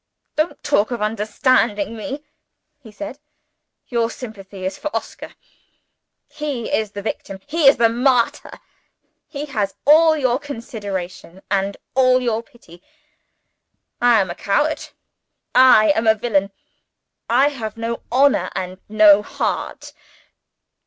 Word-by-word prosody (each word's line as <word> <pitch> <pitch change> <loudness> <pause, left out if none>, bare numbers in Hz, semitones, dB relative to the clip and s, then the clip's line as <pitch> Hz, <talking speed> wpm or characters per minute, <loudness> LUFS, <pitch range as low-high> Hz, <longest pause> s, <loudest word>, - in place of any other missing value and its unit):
"Don't 310 +3 -2
talk 285 -8 +2
of 240 -2 -4
understanding 215 0 0
me," 275 +6 -6 0.6
he 235 -6 -14
said. 295 +5 -8 0.7
"Your 235 -2 0
sympathy 200 -6 -9
is 190 +1 -2
for 300 - -5
Oscar. - - -6 0.9
He 285 -6 -5
is 215 -2 -2
the 200 - -6
victim; 195 -2 -5
he 300 0 +2
is 275 - +7
the 230 - +5
martyr; 245 +1 0 0.7
he 285 -1 -6
has 215 -9 -3
all 315 +2 +6
your 255 -3 +1
consideration 200 - -7
and 200 0 0 0.2
all 255 -1 +4
your 230 -3 -1
pity. 230 - -19 1.2
I 240 -2 +5
am 190 -3 0
a - - -6
coward; 295 +13 -1 0.6
I 255 -2 +6
am 225 -6 0
a 220 - +6
villain; 200 -3 0 0.8
I 260 +5 +4
have 225 -7 -6
no 230 +1 -4
honor 275 +3 +3
and 185 0 -5
no 210 -1 +6
heart. - - -4
230 Hz, 125 wpm, -20 LUFS, 205-270 Hz, 1.2 s, is